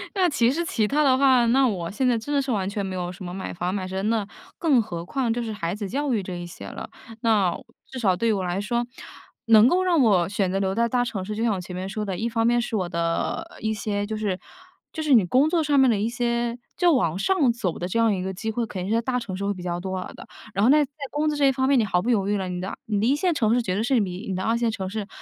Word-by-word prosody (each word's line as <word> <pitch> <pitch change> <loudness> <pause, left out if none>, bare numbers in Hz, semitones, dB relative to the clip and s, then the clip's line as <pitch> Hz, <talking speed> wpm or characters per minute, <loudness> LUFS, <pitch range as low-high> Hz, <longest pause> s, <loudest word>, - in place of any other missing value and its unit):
那 375 -2 +3
其 245 -5 +2
实 335 +5 -1
其 220 -9 0
他 295 +6 +2
的 260 -2 +4
话， 260 -3 +5
那 265 +3 +4
我 180 -7 -2
现 255 +7 0
在 245 -2 +3
真 260 +6 -4
的 285 - +3
是 270 -1 -3
完 195 -4 0
全 200 0 -3
没 190 -1 -4
有 180 -1 -3
什 185 - -10
么 175 0 -6
买 190 0 -5
房 175 +1 -2
买 190 -2 -3
车， 190 +1 -3
那 215 -1 0 0.3
更 290 -8 +4
何 170 -6 -6
况 250 +3 -1
就 240 - -2
是 225 -2 -4
孩 170 -4 -3
子 205 0 -4
教 285 +4 -1
育 215 - +1
这 185 -1 -6
一 175 0 -6
些 175 - -10
了。 - - -7 0.3
那 210 -7 +3 0.4
至 265 - -8
少 200 -7 +2
对 230 +6 -1
于 - - +4
我 195 -2 -1
来 180 +1 -2
说， 235 +3 -1 0.6
能 225 0 +7
够 365 +7 +3
让 350 -5 +3
我 195 -8 +4
选 190 -2 0
择 195 - 0
留 190 0 -1
在 235 +1 +2
大 245 +1 +2
城 200 -5 -4
市， 210 +3 -5
就 225 - -2
像 230 -2 +2
我 190 - -3
前 180 0 -8
面 185 +1 -4
说 210 +2 -4
的， 190 -3 -3
一 225 - -1
方 225 0 0
面 240 +1 +3
是 235 -1 -3
我 185 -4 -1
的 170 -1 -2
一 220 0 0
些 205 -1 -2
就 215 +1 -4
是 205 -4 -1 0.5
就 320 - -5
是 305 -3 +2
你 220 -7 +6
工 260 - +3
作 330 -1 +1
上 290 -2 +3
面 265 -1 +5
的 225 - +2
一 210 - 0
些 235 0 -1 0.2
就 350 -2 +4
往 170 - +1
上 290 - +2
走 195 -8 -3
的 175 - -2
这 185 - -2
样 230 -2 +3
一 185 - -2
个 190 +1 -3
机 220 +4 -4
会， 235 +1 -1
肯 185 -4 -5
定 190 - -4
是 225 - +2
在 - - +1
大 250 +1 -1
城 210 -6 -6
市 200 +2 -4
会 200 - 0
比 185 -2 -9
较 175 -1 -2
多 185 0 -4
的。 - - -12 0.3
然 195 - 0
后 235 - +5
呢， 295 - +6
在 280 - -26 0.2
工 300 +1 -1
资 300 - -1
这 285 - +3
一 - - +5
方 260 +1 0
面， 275 -2 +4
你 225 - +2
毫 180 -3 +1
不 235 - -2
犹 205 -5 +2
豫 205 - +1
了， 190 -2 -3
你 180 0 -4
的 190 - -5
你 210 -2 -1
的 210 - +1
一 270 - +4
线 350 +4 +1
城 225 -7 +2
市 245 - +2
绝 185 -6 -2
对 205 - 0
是 245 +1 +2
比 190 +2 -4
你 190 - -1
的 185 - -3
二 225 +3 +1
线 235 -1 +1
城 190 -4 -4
市 205 0 -4
220 Hz, 335 characters per minute, -24 LUFS, 190-245 Hz, 0.6 s, 能